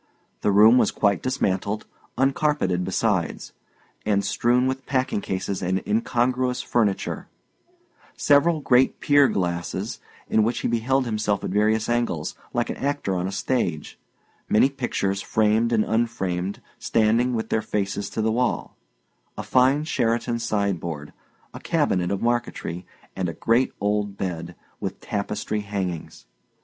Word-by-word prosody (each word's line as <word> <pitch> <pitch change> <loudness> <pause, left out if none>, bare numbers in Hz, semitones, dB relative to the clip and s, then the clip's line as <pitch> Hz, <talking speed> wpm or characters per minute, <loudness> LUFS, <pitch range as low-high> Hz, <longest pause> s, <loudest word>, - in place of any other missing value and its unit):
The 105 - +2
room 110 +5 +7
was - - +3
quite 100 -3 +1
dismantled, 105 -5 -1 0.3
uncarpeted 135 - +1
besides, 95 -1 -1 0.5
and 100 -2 +1
strewn 120 +5 +2
with 130 0 -2
packing 130 -6 0
cases 95 0 -3
and 95 +1 -1
incongruous 125 - 0
furniture; 105 -5 0 0.9
several 155 +2 +4
great 130 -1 +3
pier 145 -1 +5
glasses, 85 -5 -2 0.3
in 110 - +3
which 115 +3 0
he - - 0
beheld 125 +3 +1
himself 105 -3 -1
at - - -3
various 110 +2 +2
angles, 120 -10 -1 0.2
like - - -1
an - - -6
actor 140 -8 -1
on 90 0 -1
a - - -4
stage; 95 - -2 0.5
many 110 +6 +5
pictures, 100 -7 -2
framed 110 +3 +2
and 110 -2 +2
unframed, 100 -5 -1 0.2
standing, 115 +3 +2
with 110 0 -3
their 110 - +1
faces 100 -1 -2
to 110 - -2
the 110 - +2
wall; 120 +1 -1 0.6
a - - -4
fine 130 +3 +3
Sheraton 120 -5 0
sideboard, 95 -9 -2 0.4
a - - -8
cabinet 90 -1 +1
of 100 +2 -2
marquetry, 115 -7 -2 0.3
and 90 -2 -1
a - - -4
great 115 +8 +2
old 105 -1 -1
bed, 85 -2 -4 0.2
with - - -4
tapestry 105 +1 -3
hangings. 95 -5 -5
110 Hz, 135 wpm, -24 LUFS, 95-125 Hz, 0.9 s, room